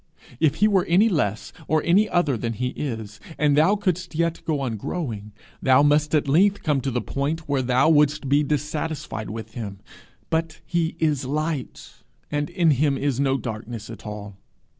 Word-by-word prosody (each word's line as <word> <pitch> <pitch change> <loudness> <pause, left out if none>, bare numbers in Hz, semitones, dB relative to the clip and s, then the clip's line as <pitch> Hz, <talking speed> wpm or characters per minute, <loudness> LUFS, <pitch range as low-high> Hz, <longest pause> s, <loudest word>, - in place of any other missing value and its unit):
If 155 -3 +3
he 210 - +4
were 195 -4 +2
any 195 +7 +4
less 110 - -1
or 155 -1 +2
any 205 +5 +3
other 175 -7 +2
than 115 0 -3
he 125 +3 -2
is, 110 -6 -5 0.2
and 150 -1 +3
thou 160 +8 +4
couldst 185 -4 -2
yet 170 0 0
go 155 -3 0
on 125 -4 -2
growing, 110 - -4 0.3
thou 130 +2 +5
must 150 +1 +3
at 145 - +1
length 195 +8 +3
come 145 -4 +1
to 135 - -2
the 125 -2 -2
point 150 +6 -3
where 140 -2 +1
thou 130 +2 +3
wouldst 150 -2 +3
be 140 +2 +4
dissatisfied 150 -5 -3
with 110 +1 -7
him; 100 -5 -6 0.5
but 160 0 -1
he 170 -1 -1
is 150 -4 0
light, 150 0 -4 0.3
and 145 0 -1
in 175 -3 +3
him 140 0 +2
is 140 -3 -1
no 135 -1 +2
darkness 115 -1 -6
at 110 -1 -10
all. 105 -2 -7
145 Hz, 180 wpm, -24 LUFS, 125-160 Hz, 0.5 s, thou